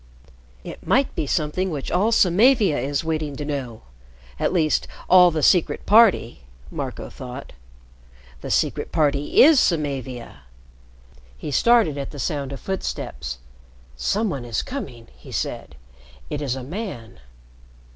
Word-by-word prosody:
"It - - -10
might 270 +1 +2
be 145 - -3
something 175 +4 -1
which 145 -5 -5
all 205 +6 +2
Samavia 205 - +4
is 140 +4 -2
waiting 155 -3 -2
to 145 - -5
know 135 -6 -5 0.6
at - - +1
least 160 -4 +1 0.2
all 180 0 +7
the 155 -3 -2
Secret 180 -4 +3
Party," 205 - +4 0.3
Marco - - -5
thought. 130 +2 -9 0.9
"The - - -6
Secret - - 0
Party 145 -2 +3
is 300 -1 +7
Samavia," 135 - -2 1.0
he 150 - -6
started 200 - +3
at 140 - -4
the 145 - -10
sound 140 -2 -3
of 140 - -6
footsteps. 60 - -5 0.6
"Some 205 - 0
one 135 -5 -4
is 115 -2 -2
coming!" 125 - -7
he - - -14
said. - - -4 0.6
"It 150 - -3
is 135 -3 -2
a 130 - -6
man." 140 - -7
150 Hz, 135 wpm, -22 LUFS, 135-190 Hz, 1.0 s, all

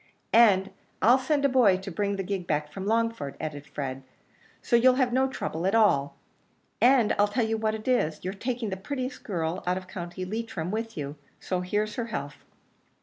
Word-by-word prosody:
"And 200 -4 +5 0.3
I'll 245 +4 +5
send 285 +1 +1
a - - +7
boy 245 -8 +4
to 190 +1 -7
bring 200 +3 -1
the 195 - -3
gig 190 -2 -3
back 150 0 -1
from 195 +3 -6
Longford," 230 -10 0
added 145 -2 -5
Fred, 135 -2 -5 0.6
"so 240 - +1
you'll 250 +2 +6
have 255 -2 +1
no 265 +1 +3
trouble 175 -9 -3
at 195 - +2
all; 175 -11 +3 0.7
and 245 -3 +5
I'll 205 - +5
tell 225 +3 0
you 220 0 0
what 220 0 0
it 215 +2 -9
is, 160 -12 +1
you're 185 - -2
taking 235 +1 -3
the 190 - -3
prettiest 255 +6 -5
girl 170 -2 -2
out 180 +1 +1
of 185 -1 -7
County 185 -1 -6
Leitrim 195 -4 -4
with 225 0 -4
you 145 0 -5 0.2
so 185 -1 -2
here's 210 +3 -2
her 235 - -1
health." 145 -10 -6
205 Hz, 200 wpm, -27 LUFS, 175-230 Hz, 0.7 s, a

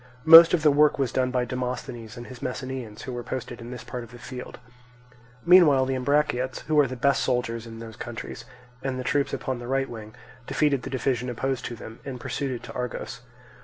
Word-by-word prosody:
Most 165 +2 +10
of 160 - -3
the 150 - +6
work 150 +1 +4
was 135 -4 0
done 130 -1 +1
by 125 -1 0
Demosthenes 125 -2 -5
and 120 - -8
his 130 0 -11
Messenians, 130 -4 -5
who 130 - -6
were 120 - -4
posted 120 -1 -6
in 115 - -8
this 125 -1 -7
part 125 -1 -6
of 115 - -12
the 120 - -11
field. 125 +1 -8 0.9
Meanwhile 165 -7 +7
the 135 - -1
Ambraciots 130 -1 0
(who 155 -1 +2
are 145 - +5
the 130 - -5
best 140 +3 +2
soldiers 120 -2 -1
in 115 0 -9
those 115 -1 -9
countries) 120 0 -7 0.4
and 135 -1 -3
the - - -3
troops 140 +2 0
upon 130 -2 -3
the 120 - -8
right 135 +1 0
wing, 110 -3 -9 0.3
defeated 145 -4 +1
the - - -6
division 125 -1 -1
opposed 130 +2 -2
to 120 - -5
them 110 0 -10
and 130 -2 -6
pursued 140 +3 -3
it 125 -2 -5
to - - -9
Argos. 125 -1 -5
125 Hz, 215 wpm, -26 LUFS, 120-135 Hz, 0.9 s, Most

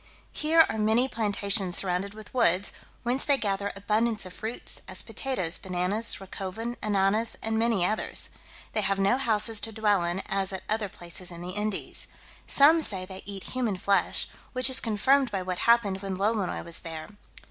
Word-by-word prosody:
Here 320 +1 +4
are 220 - -4
many 220 +4 +4
plantations 200 -5 +1
surrounded 195 +2 -1
with 215 -1 -12
woods, 200 -6 +3 0.3
whence 250 +3 +2
they 285 -2 +3
gather 200 -3 -2
abundance 215 +2 0
of 185 - -9
fruits, 220 +5 -4
as - - -4
potatoes, 190 -11 -2
bananas, 190 +5 0
racoven, 195 +5 -5
ananas, 210 +2 +1
and 225 0 0
many 225 -6 +2
others. 215 +3 -2 0.4
They 215 - +1
have 195 -1 0
no 200 +6 +2
houses 220 -3 +2
to 225 - -2
dwell 210 -4 +1
in, 175 +3 -1
as 195 0 0
at 190 - -5
other 215 -1 -1
places 175 0 -4
in 170 -1 -8
the 180 - -5
Indies. 210 +1 +1 0.4
Some 310 +4 +6
say 190 -10 0
they 190 0 -7
eat 195 -2 -5
human 240 -7 -1
flesh, 200 +2 +2 0.3
which 255 0 +3
is 260 - +4
confirmed 255 +5 +2
by 195 -3 -3
what 180 -1 -4
happened 205 -5 +3
when 195 -2 -4
Lolonois 205 -1 -1
was 170 -1 0
there. 160 -1 -7
205 Hz, 175 wpm, -27 LUFS, 190-230 Hz, 0.4 s, Some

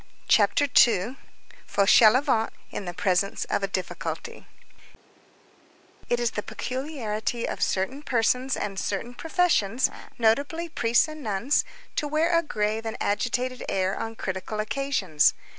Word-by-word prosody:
CHAPTER 290 - +4
II—FAUCHELEVENT 230 0 +3 0.2
IN 200 - -5
THE 175 - -5
PRESENCE 185 +2 0
OF - - +1
A 195 - 0
DIFFICULTY 185 -1 -5 1.6
It 240 - +1
is 240 -1 0
the 210 - -3
peculiarity 240 -4 -3
of - - -5
certain 225 +10 0
persons 250 0 +1
and 195 -2 -3
certain 230 +5 -3
professions, 265 - +1 0.3
notably 280 +9 +1
priests 235 -6 +2
and 310 0 -8
nuns, 225 +4 +1 0.3
to 300 - 0
wear 320 +3 +2
a 335 - +4
grave 215 -7 -2
and 225 -1 -4
agitated 245 +4 -1
air 190 0 0
on 225 0 -5
critical 190 +2 -4
occasions. 215 - +1
230 Hz, 125 wpm, -26 LUFS, 205-275 Hz, 1.6 s, CHAPTER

